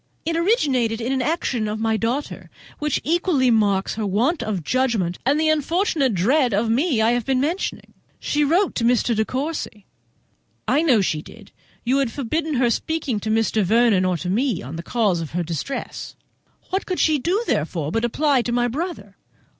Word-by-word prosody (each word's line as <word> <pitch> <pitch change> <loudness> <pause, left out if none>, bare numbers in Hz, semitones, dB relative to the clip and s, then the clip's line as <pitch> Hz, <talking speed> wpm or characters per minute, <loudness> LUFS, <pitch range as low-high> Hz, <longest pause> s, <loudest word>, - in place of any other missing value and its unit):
"It 330 +1 -1
originated 280 - +1
in 240 +2 -2
an 265 -1 0
action 255 -6 -1
of 215 +1 -3
my 225 0 +1
daughter's, 235 +7 -3 0.3
which 300 -2 0
equally 315 -6 +2
marks 200 -4 +2
her 220 -1 -3
want 240 - +1
of 195 -6 -3
judgment 225 - 0
and 290 +3 +3
the 315 0 +2
unfortunate 310 - +1
dread 245 - +2
of 220 +2 +1
me 255 -2 +2
I 225 - +4
have 240 -1 0
been 260 +2 0
mentioning—she 295 -1 -3
wrote 345 +7 +2
to 235 - -2
Mr. 240 0 +2
De 220 - +2
Courcy." 255 -5 -4 0.8
"I 290 - +3
know 260 -10 +4
she 155 -5 -1
did; 205 +5 -15 0.3
you 260 +3 +2
had 265 -4 0
forbidden 295 +5 -2
her 245 -2 +2
speaking 285 -6 -2
to 215 - -4
Mr. 220 0 +1
Vernon 220 0 +3
or 185 -1 +1
to 180 +2 -4
me 235 -1 0
on 135 +6 -7
the 165 - -5
cause 200 -3 0
of 160 - -7
her 175 0 0
distress; 170 - -5 0.6
what 380 +1 -1
could 365 - -2
she 310 -2 +3
do, 370 - 0
therefore, 155 - -1
but 225 +4 -1
apply 275 +2 +2
to 240 - -3
my 240 0 +1
brother?" 250 - -5
245 Hz, 185 wpm, -22 LUFS, 215-295 Hz, 0.8 s, I